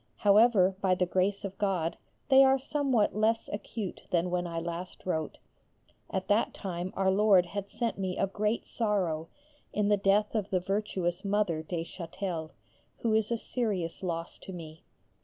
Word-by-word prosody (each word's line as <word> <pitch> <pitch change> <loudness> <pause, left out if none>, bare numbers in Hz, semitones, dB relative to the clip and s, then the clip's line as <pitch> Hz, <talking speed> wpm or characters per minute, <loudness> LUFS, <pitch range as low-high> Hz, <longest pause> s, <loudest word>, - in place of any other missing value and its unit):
However, 205 -2 +5
by 185 -2 +3
the 180 - +1
grace 190 +3 0
of 195 0 -7
God 180 -5 0 0.3
they 270 0 +8
are 265 0 +5
somewhat 265 -6 +1
less 220 +2 +1
acute 205 -1 -5
than 175 0 +1
when 175 0 0
I 170 -1 -5
last 170 +2 -5
wrote. 160 -4 -2 0.7
At 190 0 -3
that 205 +2 +2
time 180 -2 -4
Our 190 -1 +3
Lord 195 -2 +5
had 200 +2 -5
sent 230 -4 -2
me 185 -1 -2
a - - +2
great 210 +3 -1
sorrow 185 -8 -1 0.4
in 210 -1 +1
the 205 - +4
death 200 +2 +2
of 210 -3 -1
the 185 - +2
virtuous 190 -1 -1
Mother 200 -5 +1
(de 165 +1 -3
Châtel), 170 -1 -5 0.5
who 225 -2 +1
is 220 -1 +2
a 235 - +2
serious 205 -9 -2
loss 170 -2 -4
to - - -9
me. 160 -3 -9
195 Hz, 170 wpm, -30 LUFS, 175-210 Hz, 0.7 s, they